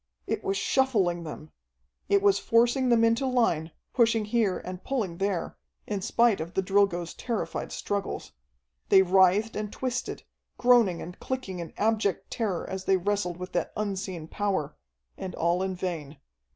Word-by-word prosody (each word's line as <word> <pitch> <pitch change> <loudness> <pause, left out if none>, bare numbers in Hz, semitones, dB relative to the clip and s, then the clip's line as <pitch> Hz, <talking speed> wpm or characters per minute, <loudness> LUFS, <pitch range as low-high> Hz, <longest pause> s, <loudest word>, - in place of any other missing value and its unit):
It - - -2
was 195 0 0
shuffling 195 -9 +1
them! 155 0 -8 0.6
It 200 0 +4
was 200 -1 +4
forcing 240 +3 +3
them 235 -1 +4
into 230 +4 +3
line, 225 -11 +1 0.2
pushing 230 -3 +3
here 210 -3 +1
and 185 0 -7
pulling 215 -11 -2
there, 195 -3 -1 0.3
in 205 -2 -3
spite 230 -1 +3
of 170 +2 -7
the 190 - +1
Drilgoes' 185 -3 +1
terrified 235 -4 -3
struggles. 200 -1 -3 0.6
They 190 - +7
writhed 190 +4 +4
and 210 -1 -3
twisted, 255 -1 -3 0.3
groaning 240 -8 +4
and 180 +2 -9
clicking 250 -9 -4
in 170 - -6
abject 210 -3 0
terror 205 -7 -2
as 190 0 -5
they 195 - +4
wrestled 185 -2 -1
with 180 0 -7
that 175 - -2
unseen 190 -5 -3
power, 190 -6 -2 0.4
and 185 -2 -5
all 170 +2 +1
in 190 0 -1
vain. 165 -5 -4
195 Hz, 155 wpm, -27 LUFS, 180-225 Hz, 0.6 s, They